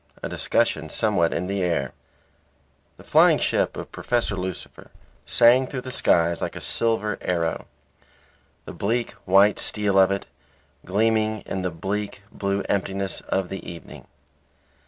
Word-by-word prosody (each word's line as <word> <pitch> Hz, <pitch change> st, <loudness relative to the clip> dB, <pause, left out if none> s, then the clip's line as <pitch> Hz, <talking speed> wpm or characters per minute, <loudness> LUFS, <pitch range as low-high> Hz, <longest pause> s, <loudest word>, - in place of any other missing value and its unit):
A -, -, -3 dB
DISCUSSION 80 Hz, -, 0 dB
SOMEWHAT 90 Hz, -4 st, +1 dB
IN 85 Hz, -, -2 dB
THE 100 Hz, +1 st, -2 dB
AIR 85 Hz, -7 st, -1 dB, 1.0 s
The -, -, -15 dB
flying -, -, +5 dB
ship -, -, 0 dB
of -, -, -7 dB
Professor 120 Hz, -4 st, -1 dB
Lucifer 95 Hz, -1 st, -7 dB, 0.4 s
sang 125 Hz, +2 st, +5 dB
through 130 Hz, -2 st, -5 dB
the 130 Hz, -, -7 dB
skies 85 Hz, -9 st, +2 dB
like -, -, -3 dB
a -, -, -5 dB
silver 110 Hz, -3 st, 0 dB
arrow; 85 Hz, -2 st, -2 dB, 1.0 s
the -, -, -8 dB
bleak 115 Hz, +4 st, -1 dB
white 100 Hz, +2 st, +5 dB
steel 100 Hz, -2 st, +1 dB
of 95 Hz, 0 st, +6 dB
it, 100 Hz, 0 st, -2 dB, 0.6 s
gleaming 110 Hz, +2 st, +1 dB
in 95 Hz, -, -4 dB
the 90 Hz, -, -1 dB
bleak 100 Hz, +4 st, -4 dB
blue 100 Hz, 0 st, -2 dB
emptiness 95 Hz, 0 st, -1 dB
of 95 Hz, -2 st, 0 dB
the 95 Hz, -, -5 dB
evening. 85 Hz, -1 st, -10 dB
100 Hz, 140 wpm, -24 LUFS, 90-110 Hz, 1.0 s, of